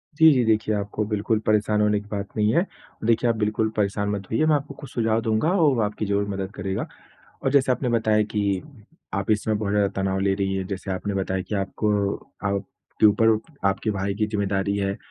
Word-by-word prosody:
जी, 160 0 +7
जी, 125 -3 +3
देखिए 110 -1 +2
आपको 105 +1 -2
बिल्कुल 105 +1 0
परेशान 105 0 +2
होने 105 0 +3
की 105 - -13
बात 100 -1 -3
नहीं 105 +1 +2
है, 175 - +3 0.4
देखिए 115 +1 +3
आप 115 - +2
बिल्कुल 110 +1 0
परेशान 100 0 0
मत 100 -2 -3
होइए, 115 +8 +2
मैं 155 -1 +4
आपको 140 0 -3
कुछ 140 -1 -11
सुझाव 115 -1 +1
दूँगा 110 +6 +1
और 165 -7 +4
वो 115 - +1
आपकी 105 0 -1
ज़रूर 100 0 0
मदद 95 -1 -3
करेगा। 95 -1 -3 0.6
और 135 - +1
जैसे 135 -2 +4
आपने 125 0 0
बताया 110 -2 +2
कि, 100 -3 -1 0.5
आप 100 +1 -1
इस 105 -1 +2
समय 110 - 0
बहुत 105 -1 -2
ज़्यादा 105 -1 +3
तनाव 95 0 0
ले 95 0 +2
रही 95 0 -1
हैं, 95 -1 -2
जैसे 95 0 -4
आपने 95 +2 -3
बताया 95 -1 -1
कि 105 - -4
आपको 100 0 0 0.3
आपके 100 +2 -2
ऊपर 105 +2 +5 0.4
आपके 100 +3 0
भाई 100 0 -2
की 105 +1 +1
ज़िम्मेदारी 100 -1 -1
है, 100 0 -1
105 Hz, 215 wpm, -24 LUFS, 100-110 Hz, 0.6 s, जी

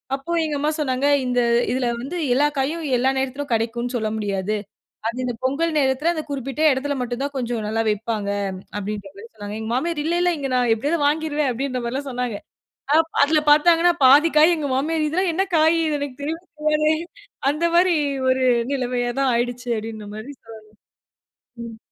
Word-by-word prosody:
அப்போ 275 +5 -7
எங்க 300 -1 -2
அம்மா 300 +2 +1
சொன்னாங்க 265 -1 0 0.2
இந்த 250 0 +1 0.3
இதுல 250 -1 0
வந்து 320 +8 -5 0.2
எல்லா 290 +3 +3
காயும் 310 +5 -1
எல்லா 260 +2 +2
நேரத்துலயும் 265 +1 -3
கடைக்கும்னு 235 +2 -1
சொல்ல 220 -2 -1
முடியாது. 200 0 -2 0.5
அது 235 +2 -3
இந்த 245 -1 -2
பொங்கல் 310 +5 0
நேரத்துல 275 +4 +2
அந்த 315 -2 -4
குறிப்பிட்ட 275 +2 -4
எடத்துல 280 +2 -1
மட்டும் 245 +1 -3
தான் 285 0 -3
கொஞ்சம் 235 -3 -2
நல்லா 225 +1 0
விப்பாங்க 210 -1 -2 0.5
அப்டின்ற 205 -1 -5
மாதிரி 215 +3 -11
சொன்னாங்க. 205 -1 -7
எங்க 220 - -5
மாமியாரு 310 +4 -1
இல்ல, 340 +1 0
இல்ல 355 0 +3
இங்க 275 -2 -3
நா - - +3 0.2
எப்டியாவது 295 +9 -1
வாங்கிருவேன் 300 -2 0
அப்டின்ற 255 0 -3
மாரிலாம் 270 +4 -3
சொன்னாங்க. 245 -4 -3 0.6
அ - - +6 0.3
அதுல 305 +1 +3
பாத்தாங்கன்னா 335 +3 +5
பாதிக்காய் 305 +4 +6
எங்க 290 -2 -3
மாமியாரு 310 +3 0
இதெல்லாம் 360 +2 0
என்ன 380 +3 +1
காய் 320 +2 +4 0.2
எனக்கு 280 -2 -6
தெரியவே 320 +3 -3 0.2
தெரியாதே 305 0 +2 0.6
அந்த 315 +3 -1
மாரி 355 0 +4 0.3
ஒரு 260 0 +2 0.3
நிலமையா 245 -2 -1
தான் 265 -2 +2
ஆயிடுச்சு 245 +1 -2
அப்டின்ற 215 -1 -7
மாரி 225 +7 -7
சொல்லலாம். 220 -1 -13 1.0
ம் 225 -1 -9
265 Hz, 170 wpm, -22 LUFS, 235-305 Hz, 1.0 s, அ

